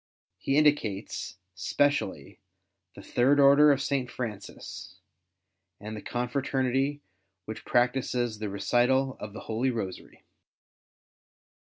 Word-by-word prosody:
He 135 - 0
indicates, 115 - 0 0.2
specially, 95 - -1 0.6
the - - -11
Third 135 +4 +3
Order 140 +2 +7
of 140 -1 +1
Saint 135 -4 -1
Francis 110 -6 -7 0.8
and 110 +1 -7
the 105 - -7
confi'aternity 130 +3 -1 0.4
which 110 - -7
practices 120 -2 +1
the 105 -1 -3
recital 125 +6 +1
of 105 -1 -7
the - - -8
Holy 115 +4 -1
Kosary. 110 -7 -6
125 Hz, 105 wpm, -28 LUFS, 110-135 Hz, 0.8 s, Order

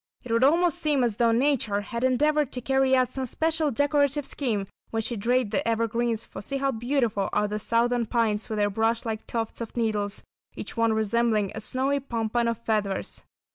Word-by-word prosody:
It 250 - -7
would 230 +2 +3
almost 335 +4 +3
seem 295 -4 +2
as 230 -4 0
though 235 -1 +3
nature 230 -5 +1
had 235 +4 -5
endeavoured 290 +2 +2
to 250 - -1
carry 265 +1 +3
out 255 -1 +2
some 260 0 -3
special 320 +3 0
decorative 285 +1 +1
scheme 225 -10 -2 0.2
when 225 0 -2
she 235 +2 -2
draped 235 +1 +1
the - - 0
evergreens, 230 0 0
for - - -9
see 275 +6 -3
how 275 0 +1
beautiful 235 -4 0
are 210 - +1
the 210 +1 -3
Southern 235 +2 +1
Pines 220 -3 0
with 220 - -2
their 205 0 +1
brush 225 +3 0
like 220 -1 -4
tufts 225 0 -3
of 230 +1 -7
needles, 210 -3 -1 0.3
each - - -6
one 230 -1 +2
resembling 220 -1 +1
a 220 - -6
snowy 265 +5 0
pompon 235 -2 -1
of 230 -1 0
feathers. 210 -4 -2
235 Hz, 195 wpm, -26 LUFS, 220-265 Hz, 0.3 s, would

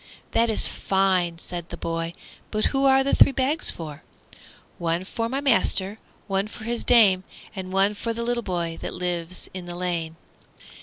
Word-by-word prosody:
"That 230 0 +2
is 220 - +3
fine!" 185 -3 +1
said 175 0 -6
the - - -6
boy; 165 0 -3 0.4
"but 215 0 0
who 270 0 +2
are 270 0 +6
the 275 - 0
three - - +7
bags 270 +4 +1
for?" 155 -3 -5 0.8
"One 170 +1 0
for 230 +4 -3
my 270 +3 -1
master, 220 -6 +2 0.3
one 195 0 0
for 220 - -11
his 235 +1 -1
dame, 205 -6 +5 0.3
And 185 -1 -6
one 195 +2 +3
for 230 +3 -3
the 230 +1 -3
little 240 0 0
boy 170 -5 -3
that - - -5
lives 180 0 -3
in 185 -1 -7
the 175 - -6
lane." 170 -3 -2
190 Hz, 175 wpm, -24 LUFS, 175-230 Hz, 0.8 s, three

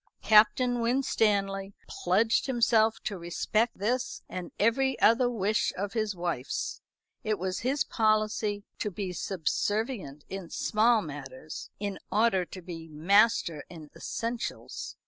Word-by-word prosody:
Captain 240 +3 +5
Winstanley 205 -5 +1
pledged 215 +9 +1
himself 230 -3 +3
to 200 -3 -3
respect 215 +7 0
this 245 +6 -2
and 180 -2 -6
every 265 +5 +2
other 240 +3 +5
wish 215 -2 +1
of 200 +1 -3
his 215 -3 -1
wife's. 170 -7 -3 0.4
It 215 -1 0
was 185 0 -2
his 270 +4 +1
policy 215 -2 +1 0.2
to 210 - -1
be 190 -1 -4
subservient 190 - -2
in 190 -3 -6
small 220 0 +2
matters, 145 0 -8
in 200 -2 -3
order 205 -4 +3
to 185 +1 -10
be 165 -2 -8
master 170 0 +3
in 155 -4 -11
essentials. 230 +1 -4
205 Hz, 125 wpm, -29 LUFS, 180-230 Hz, 0.4 s, Captain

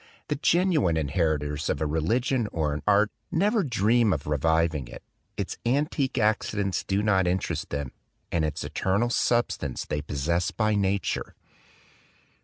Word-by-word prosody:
The 150 - +1
genuine 160 - +2
inheritors 75 -2 -1
of - - 0
a 80 - 0
re 75 +2 0
ligion 120 - +1
or 75 -3 -1
an 75 - -4
art 105 +1 +4 0.2
never 210 +6 +2
dream 115 - +2
of 70 - -4
reviving 80 -1 +1
it; - - -11 0.3
its - - -4
antique 135 +1 0
accidents 105 -3 0
do 100 +1 0
not 95 -3 +3
interest 90 +1 -1
them, 70 -3 -3 0.4
and 85 - +1
its 75 - -2
eternal 100 +6 0
substance 120 - 0
they 75 - -2
possess 75 +5 -1
by 110 -1 0
nature." 100 -1 -1
95 Hz, 145 wpm, -26 LUFS, 80-120 Hz, 0.4 s, art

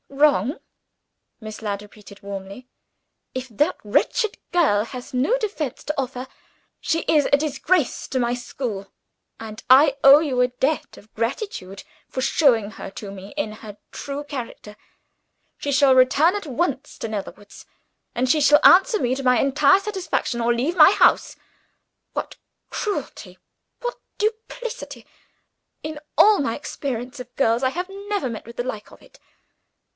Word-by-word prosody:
"Wrong?" 280 - +2 0.8
Miss 215 -1 -9
Ladd 205 -2 -3
repeated 210 -1 -15
warmly. 200 +4 -8 0.7
"If 255 0 -4
that 235 +7 0
wretched 410 - 0
girl 295 -13 +3
has 250 +2 -9
no 275 - +2
defense 395 - -4
to 300 -1 -2
offer, 260 -1 -4 0.5
she 330 0 0
is 300 -2 +2
a 285 - +6
disgrace 305 +1 0
to 260 - -1
my 240 -1 +1
school 245 -5 -5 0.5
and 220 -1 -9
I 275 +2 +7
owe 275 +2 +9
you 270 -6 0
a 250 - +4
debt 265 +5 -2
of 215 - -18
gratitude 230 - -4 0.3
for - - -5
showing 245 -6 +3
her - - -8
to 200 0 -8
me 195 0 -10
in 220 -8 -2
her 215 -1 -11
true 280 +1 -5
character. 245 -7 -8 0.8
She 285 - -3
shall 275 -1 +5
return 280 +8 +4
at 405 -6 -5
once 285 0 -2
to - - -3
Netherwoods; 205 -1 -8 0.5
and 250 +2 +1
she 300 +4 +3
shall 295 +1 +6
answer 390 +5 +6
me 250 -3 0
to 275 - -5
my 250 -1 +4
entire 290 +6 +4
satisfaction 380 - -2
or 235 +1 +2
leave 265 +9 -1
my 325 0 +8
house. - - +3 0.8
What - - -5 0.3
cruelty! 415 -2 -5 0.4
what 485 0 -4 0.2
duplicity! 455 +3 -4 0.8
In 310 -1 -5 0.2
all 420 -1 +6
my 230 -5 -1
experience 255 -4 -5
of 250 0 -9
girls, 235 -3 +2
I 260 - +3
have 360 +7 -4
never 400 -6 -3
met 225 - -7
with 235 +1 -12
the 245 - -1
like 215 -4 -6
of - - -16
it. - - -20
260 Hz, 155 wpm, -22 LUFS, 230-310 Hz, 0.8 s, owe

